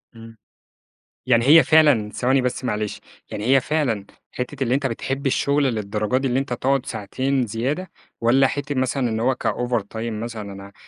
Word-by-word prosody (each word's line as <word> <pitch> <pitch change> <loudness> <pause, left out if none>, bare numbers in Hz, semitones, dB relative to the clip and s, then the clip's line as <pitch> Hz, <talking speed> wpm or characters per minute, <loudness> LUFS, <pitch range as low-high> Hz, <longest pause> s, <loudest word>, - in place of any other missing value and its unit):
إمم. 115 0 -13 0.9
يعني 115 -2 +3
هي 160 +3 +8
فعلًا 145 -10 +4
ثواني 130 +4 +1
بس 125 +1 -2
معلش، 105 -3 -2 0.3
يعني 105 - -5
هي 135 +1 +5
فعلًا 125 -9 -1 0.3
حِتّة 130 +2 -5
اللي 125 0 +1
أنت 140 0 0
بتحب 135 +3 -3
الشغل 140 +2 +2
للدرجة 105 -1 -1
دي 135 0 0
اللي 125 +2 +1
أنت 135 -2 -3
تقعد 135 +2 0
ساعتين 130 +4 -1
زيادة، 135 - -3 0.3
والّا 130 +4 +4
حِتّة 145 +1 -3
مثلًا 130 0 0
إن 110 0 -2
هو 130 +3 +2
كover 120 -2 0
time 115 +1 -3
مثلًا، 110 -4 -6
أنا 100 0 -11
125 Hz, 170 wpm, -22 LUFS, 115-135 Hz, 0.9 s, هي